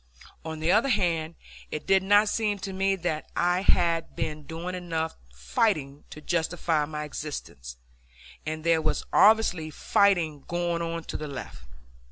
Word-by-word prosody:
On 160 -1 -5
the 160 +2 +2
other 225 +8 +4
hand, 170 -7 0 0.3
it 155 - -5
did 195 0 +4
not 205 +2 +5
seem 210 -1 0
to 195 0 -6
me 195 +1 +1
that 170 -4 -3
I 175 +1 +2
had 170 -3 +2
been 150 -2 -4
doing 170 +3 -5
enough 165 -3 -3 0.2
fighting 140 - -1
to 150 - -10
justify 165 -1 0
my 150 0 -5
existence, 140 - -7 0.7
and 155 0 -4
there 165 -1 +3
was 155 0 0
obviously 200 -7 +4
fighting 160 -3 +2
going 175 -1 -1
on 165 0 -3
to - - -5
the 150 - -5
left. 135 - -8
165 Hz, 155 wpm, -27 LUFS, 155-185 Hz, 0.7 s, not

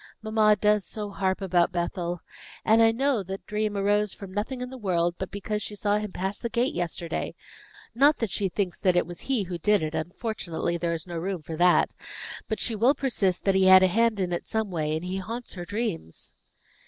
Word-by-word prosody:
"Mamma 215 -1 +4
does 210 -1 +2
so 205 +3 -6
harp 190 0 -1
about 175 -3 +2
Bethel. 175 0 -2 0.4
And 220 +1 +5
I 225 0 +6
know 265 0 +1
that 190 +1 -7
dream 210 -1 -1
arose 205 +1 +2
from 195 -2 -9
nothing 220 +6 -2
in 250 0 -5
the 260 - -7
world 175 -4 +1
but 190 - -3
because 210 +1 -3
she 210 - -5
saw 205 0 +1
him 210 -2 -5
pass 190 +3 -3
the 235 - -3
gate 235 +3 +1
yesterday. 170 -1 -3 0.6
Not 285 +5 +5
that 230 -5 -2
she 200 -2 0
thinks 185 -1 -2
that 185 -2 +3
it 175 - +3
was 175 +1 -8
he 260 -6 0
who 175 -2 -5
did 205 +1 +3
it; 155 0 -3
unfortunately, 170 0 -3
there 170 0 -1
is 165 -1 -4
no 170 -2 -5
room 185 -1 -3
for 160 +2 -6
that; 175 +2 +4 0.5
but 220 - -2
she 230 - 0
will 240 +7 +4
persist 215 -10 0
that 195 - +4
he 190 0 +4
had 190 0 +9
a - - +6
hand 225 +3 +2
in 180 -2 0
it 170 - -1
in - - -38
some 220 -3 -2
way, 155 -3 -1
and 160 +3 -4
he 185 +1 -3
haunts 230 +6 -5
her 175 -2 -6
dreams." 205 - -4
195 Hz, 225 wpm, -27 LUFS, 175-215 Hz, 0.6 s, had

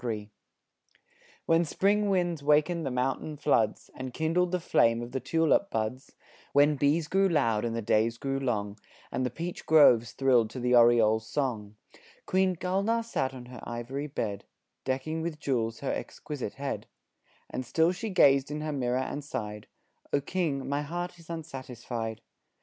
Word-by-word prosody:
III 105 -3 -4 1.1
When 165 +1 +4
spring 200 +6 +1
winds 175 -5 0
wakened 150 +2 +2
the - - 0
mountain 130 +4 -2
floods, 110 -5 +1
And 130 -1 -7
kindled 170 +3 +1
the 180 - 0
flame 115 -7 +2
of 120 - -8
the 135 - -2
tulip 165 - +2
buds, 110 +4 -3 0.4
When 145 +1 +5
bees 150 +3 +1
grew 195 +2 +3
loud 115 -10 +2
and 115 -1 -2
the 115 - -3
days 115 +2 +2
grew 135 +1 -2
long, 105 -5 -2 0.3
And 130 - -1
the 125 - 0
peach 170 +8 -6
groves 125 -8 +6
thrilled 125 -5 +3
to 130 - -7
the 125 0 +1
oriole's 115 -2 +5
song, 110 -8 -2 0.5
Queen 185 0 +2
Gulnaar 200 +7 0
sat 135 -12 -1
on 130 -2 -10
her 125 -1 -10
ivory 125 +5 -5
bed, 105 -8 -4 0.4
Decking 135 +5 -2
with 160 -2 -4
jewels 115 -6 -1
her 140 - -1
exquisite 145 -4 -5
head; 140 0 -4 0.6
And 130 - -4
still 160 +7 +2
she 215 +5 -4
gazed 140 -7 +4
in 150 +1 -4
her 155 0 -3
mirror 125 -2 0
and 130 +3 -3
sighed: 105 -7 -5 0.4
"O 145 - +3
King, 145 -3 -2
my 140 +1 0
heart 175 +3 -5
is 165 - -17
unsatisfied." 125 -8 -5
135 Hz, 165 wpm, -29 LUFS, 120-160 Hz, 1.1 s, groves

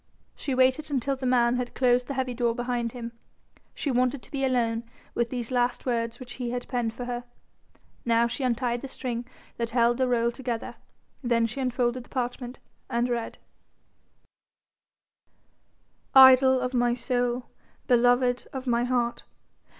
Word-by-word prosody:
She 270 - -3
waited 260 +4 +2
until 275 -1 0
the 260 -1 -3
man 245 -1 +3
had 250 -1 -4
closed 250 -1 +3
the 275 - -4
heavy 260 -1 -1
door 235 -1 0
behind 240 -1 -2
him: 235 -2 -6 0.6
she 285 - -2
wanted 255 +1 +1
to - - -14
be 275 -1 -2
alone 235 -3 +1 0.3
with 235 0 0
these 245 -1 -4
last 245 -1 0
words 235 -1 -1
which 245 -2 -8
he 240 - -2
had 245 0 -4
penned 235 -3 -2
for 245 - -5
her. 245 0 -4 0.8
Now 230 0 +3
she 250 +3 -4
untied 245 -1 0
the 275 - -6
string 245 -2 -4 0.3
that 235 -1 -2
held 240 +1 +2
the 260 - +2
roll 235 -1 +2
together, 240 -2 -4 0.5
then 235 -3 +2
she 240 +4 -4
unfolded 250 -1 0
the - - -22
parchment 245 0 -4 0.3
and 240 +1 0
read: 235 -2 -3 2.8
"Idol 260 0 +8
of 250 +1 -2
my 240 -1 +2
soul, 245 0 -1 0.4
beloved 245 0 +3
of 265 -1 -6
my 240 -1 +2
heart. 245 -1 0
245 Hz, 160 wpm, -27 LUFS, 235-255 Hz, 2.8 s, Idol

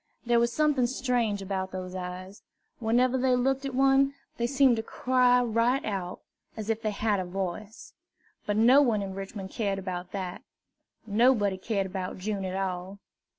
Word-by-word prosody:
There 240 0 +3
was 235 0 +2
something 295 -4 +2
strange 240 -5 -1
about 190 -1 -3
those 185 -1 -6
eyes. 185 +2 -7 0.4
Whenever 245 +3 +2
they 255 0 +3
looked 270 +2 0
at 265 - -5
one, 270 +1 +3 0.2
they 235 - 0
seemed 265 -2 +4
to - - 0
cry 250 +1 +2
right 235 +3 +1
out, 190 -4 -4 0.4
as 220 0 -2
if 225 0 -3
they 215 - -1
had 210 -1 0
a - - -1
voice. 195 +4 -6 0.5
But 205 0 0
no 250 +6 +6
one 225 -7 +2
in 190 -1 -5
Richmond 195 0 -7
cared 200 -3 -1
about 180 -2 -5
that. 185 -2 -5 0.6
Nobody 215 -2 +3
cared 200 0 -1
about 185 -1 -5
June 195 0 -3
at 185 0 -3
all. 190 0 -3
215 Hz, 170 wpm, -28 LUFS, 190-250 Hz, 0.6 s, no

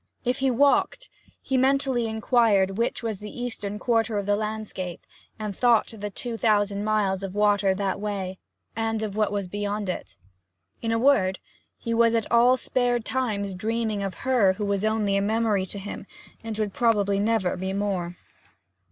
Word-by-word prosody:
If 250 +2 0
he 270 0 +2
walked, 280 - +2 0.3
he 265 - 0
mentally 265 -2 +2
inquired 220 -4 +2
which 235 - -1
was 220 -4 -3
the 210 +3 -8
eastern 210 -4 -4
quarter 225 -1 +1
of 200 - -2
the 205 0 +2
landscape, 210 -4 -5 0.3
and 210 -2 -4
thought 235 -1 +3
of 205 -2 -6
two 240 -2 -2
thousand 205 -2 +1
miles 205 -3 +1
of 195 0 -5
water 205 -2 +3
that 195 0 -2
way, 195 -3 -4 0.4
and 225 0 -1
of 205 -2 -4
what 215 -1 +1
was 200 -2 -2
beyond 205 +1 -3
it. 180 - -5 0.7
In 225 - -1
a 225 - +2
word 225 -7 +3 0.4
he 230 - -3
was 230 0 +4
at 225 -2 -1
all 240 +2 +5
spare 245 -1 +1
times 215 -5 -2
dreaming 220 +2 -2
of 195 -1 -3
her 240 -8 +4
who 205 +2 -4
was 200 0 -1
only 215 -2 +1
a - - +1
memory 210 -2 +1
to 200 - -7
him, 200 0 -7 0.4
and 225 -1 -5
would 210 -3 -2
probably 205 -4 +2
never 210 -3 +1
be 190 +1 -3
more. 190 -3 -2
210 Hz, 175 wpm, -25 LUFS, 200-230 Hz, 0.7 s, all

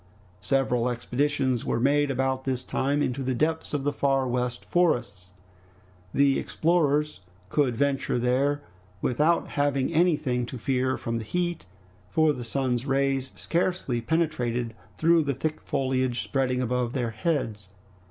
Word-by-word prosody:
Several 125 0 +1
expeditions 130 +1 0
were - - -1
made 145 +3 +3
about 130 0 0
this 130 -2 -2
time 145 +2 0
into 130 +2 -2
the 130 -1 -1
depths 160 +5 0
of 145 -2 -1
the 145 0 0
Far 135 -2 +1
West 125 0 -2
Forests. 120 - 0 0.8
The 140 -1 +3
explorers 150 -3 +1 0.3
could 135 -5 +1
venture 140 -2 +1
there 135 +4 +1 0.4
without 150 +7 +2
having 145 +1 0
anything 150 -8 +2
to 130 - -6
fear 130 +1 0
from 115 -1 -3
the - - -5
heat, 175 - -2 0.4
for 155 -1 +3
the 125 - -6
sun's 125 +1 -1
rays 135 -1 +1
scarcely 170 -8 -1
penetrated 125 -5 -1 0.2
through 165 +1 +4
the 140 -3 -1
thick 155 +3 -3
foliage 130 -2 0
spreading 130 -2 0
above 125 0 -1
their 120 -4 -1
heads. 110 - -2
135 Hz, 140 wpm, -26 LUFS, 125-145 Hz, 0.8 s, through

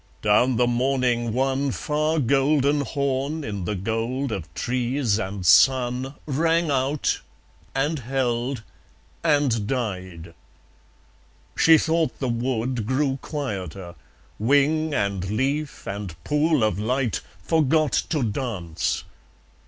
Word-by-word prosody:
Down 120 +5 +4
the 125 - +3
morning 120 -1 +1
one 135 +3 0
Far 155 +4 -1
golden 140 +2 +2
horn 140 +2 -2
in 100 -7 -4
the 105 - -2
gold 115 +7 -2
of 85 -6 -5
trees 125 -2 0
and 95 -3 -4
sun 130 - +4
Rang 165 +2 +1
out; 135 +2 0 0.5
and 145 +3 0
held; 125 -1 -1 0.6
and 145 -9 +2
died.... 95 -9 -4 1.2
She 160 -1 +6
thought 160 +1 0
the 130 - -2
wood 120 -1 -1
Grew 135 +1 0
quieter. 95 - -5 0.5
Wing, 145 +7 +2
and 100 -7 -1
leaf, 140 +7 -2
and 100 -4 -5
pool 150 -2 +2
of 105 -3 +1
light 125 +1 0 0.2
Forgot 155 - +2 0.2
to 155 -5 0
dance. 105 - -2
130 Hz, 110 wpm, -24 LUFS, 110-145 Hz, 1.2 s, She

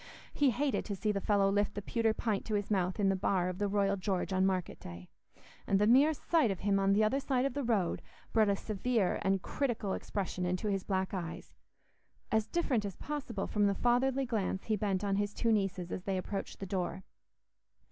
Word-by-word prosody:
He 285 -2 +3
hated 270 +4 0
to 205 - -3
see 210 +2 0
the 200 -1 -2
fellow 200 -1 +3
lift 205 0 +1
the 205 - -3
pewter 225 +1 +1
pint 220 -2 -1
to 215 - -1
his 205 0 -2
mouth 185 -1 0
in 200 -1 +3
the 195 - +2
bar 185 -1 +1
of 185 +1 -6
the 205 - +1
Royal 200 0 +1
George 190 -1 -2
on 190 0 +3
market 185 -2 -2
day, 85 +1 -10 0.6
and 195 - +3
the 205 - +3
mere 265 +7 +6
sight 310 -5 +2
of 195 -3 -3
him 195 0 +2
on 195 0 +3
the 210 +2 +4
other 215 +6 +2
side 265 -2 0
of 275 - -1
the 285 - -2
road 210 -8 0 0.3
brought 220 -2 +4
a 200 - +3
severe 215 0 0
and 195 -1 +1
critical 235 -8 -1
expression 190 -3 -3
into 180 +4 -1
his 195 -2 -1
black 190 -1 -1
eyes, 170 -3 -5 0.8
as 220 0 +2
different 260 -6 0
as 200 -2 -5
possible 265 -9 -4
from 205 -1 +2
the 200 - +1
fatherly 260 +4 +2
glance 205 -5 -2
he 220 - 0
bent 200 -2 -1
on 195 -1 +1
his 205 0 -1
two 230 - +1
nieces 195 -4 0
as - - -3
they 195 0 -2
approached 195 +2 -4
the 195 - -4
door. 190 0 -3
200 Hz, 220 wpm, -32 LUFS, 190-225 Hz, 0.8 s, mere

